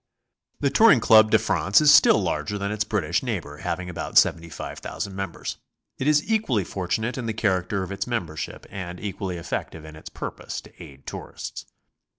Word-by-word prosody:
The 140 Hz, -, +2 dB
Touring 190 Hz, -, +6 dB
Club 110 Hz, -1 st, +6 dB
de -, -, +6 dB
France 100 Hz, +2 st, +2 dB
is 150 Hz, -1 st, +7 dB
still -, -, +7 dB
larger 75 Hz, +7 st, -2 dB
than 100 Hz, 0 st, -3 dB
its 105 Hz, 0 st, 0 dB
British 90 Hz, -7 st, 0 dB
neighbor, 90 Hz, -, -4 dB
having 90 Hz, +4 st, -3 dB
about 90 Hz, -, -3 dB
75,000 85 Hz, +3 st, 0 dB
members. 95 Hz, -2 st, -5 dB, 0.4 s
It 135 Hz, -, -1 dB
is 150 Hz, 0 st, +4 dB
equally 210 Hz, -, +1 dB
fortunate 110 Hz, +8 st, -2 dB
in 120 Hz, -, -4 dB
the 110 Hz, -, -1 dB
character 95 Hz, -2 st, 0 dB
of 95 Hz, -, -7 dB
its 100 Hz, -, -3 dB
membership, 90 Hz, -11 st, -4 dB
and 90 Hz, -2 st, -6 dB
equally 95 Hz, -3 st, -4 dB
effective 80 Hz, -1 st, -5 dB
in 80 Hz, 0 st, -11 dB
its 80 Hz, -, -10 dB
purpose -, -, -6 dB
to -, -, -17 dB
aid 70 Hz, -1 st, -14 dB
tourists. -, -, -7 dB
100 Hz, 170 wpm, -24 LUFS, 85-115 Hz, 0.4 s, is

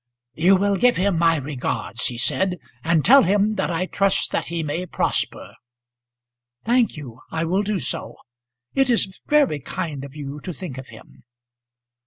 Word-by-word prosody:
"You 175 Hz, +8 st, +4 dB
will 200 Hz, +1 st, +1 dB
give 245 Hz, +2 st, +3 dB
him 190 Hz, -2 st, +1 dB
my 165 Hz, -1 st, +4 dB
regards," 135 Hz, -5 st, -3 dB
he 120 Hz, -, -4 dB
said, 180 Hz, +9 st, 0 dB, 0.3 s
"and 165 Hz, -2 st, +2 dB
tell 270 Hz, +5 st, +8 dB
him 205 Hz, +3 st, +2 dB
that -, -, -1 dB
I 175 Hz, +1 st, -1 dB
trust 195 Hz, +1 st, +1 dB
that -, -, -1 dB
he 170 Hz, -1 st, -3 dB
may 165 Hz, +5 st, -3 dB
prosper." -, -, -1 dB, 1.1 s
"Thank 240 Hz, -4 st, +2 dB
you. 130 Hz, -5 st, -9 dB
I 160 Hz, -, -2 dB
will 185 Hz, +4 st, +1 dB
do 210 Hz, 0 st, -1 dB
so. -, -, -3 dB, 0.6 s
It 270 Hz, -1 st, +2 dB
is 195 Hz, -5 st, +1 dB
very 290 Hz, -, +3 dB
kind 155 Hz, -3 st, -5 dB
of 140 Hz, 0 st, -10 dB
you 145 Hz, -1 st, -6 dB
to 180 Hz, +5 st, -6 dB
think 155 Hz, -7 st, -7 dB
of 130 Hz, -, -10 dB
him." 110 Hz, -, -16 dB
175 Hz, 170 wpm, -22 LUFS, 150-200 Hz, 1.1 s, tell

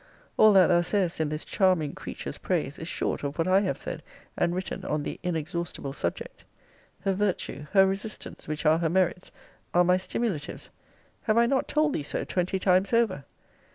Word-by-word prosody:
All 215 Hz, -, +7 dB
that 190 Hz, -2 st, +7 dB
thou 175 Hz, -1 st, +4 dB
sayest 180 Hz, -1 st, 0 dB
in 155 Hz, -2 st, 0 dB
this 155 Hz, +1 st, -4 dB
charming 185 Hz, -7 st, +2 dB
creature's -, -, -6 dB
praise -, -, -2 dB
is -, -, -6 dB
short -, -, -2 dB
of 140 Hz, 0 st, -4 dB
what 165 Hz, +1 st, 0 dB
I 185 Hz, +1 st, +5 dB
have 200 Hz, -2 st, -1 dB
said -, -, -6 dB, 0.3 s
and 175 Hz, 0 st, +1 dB
written 185 Hz, +1 st, -4 dB
on 150 Hz, -1 st, -1 dB
the -, -, -5 dB
inexhaustible 165 Hz, -4 st, -3 dB
subject. 85 Hz, -10 st, -4 dB, 0.6 s
Her 195 Hz, -, +1 dB
virtue, 185 Hz, -6 st, -2 dB
her 195 Hz, -1 st, +7 dB
resistance, 195 Hz, +3 st, -5 dB
which 155 Hz, +1 st, -4 dB
are 155 Hz, +1 st, +5 dB
her 165 Hz, -1 st, +1 dB
merits, 180 Hz, +1 st, 0 dB, 0.4 s
are 175 Hz, -, +6 dB
my 180 Hz, +1 st, +4 dB
stimulatives. 185 Hz, -5 st, -3 dB, 0.5 s
have 215 Hz, -1 st, +1 dB
I 235 Hz, -, +6 dB
not 265 Hz, +2 st, +1 dB
told 305 Hz, -1 st, +2 dB
thee -, -, -1 dB
so 145 Hz, -, -3 dB
twenty 185 Hz, +1 st, -1 dB
times 190 Hz, +2 st, +2 dB
over? 215 Hz, -11 st, +2 dB
180 Hz, 185 wpm, -27 LUFS, 160-195 Hz, 0.6 s, All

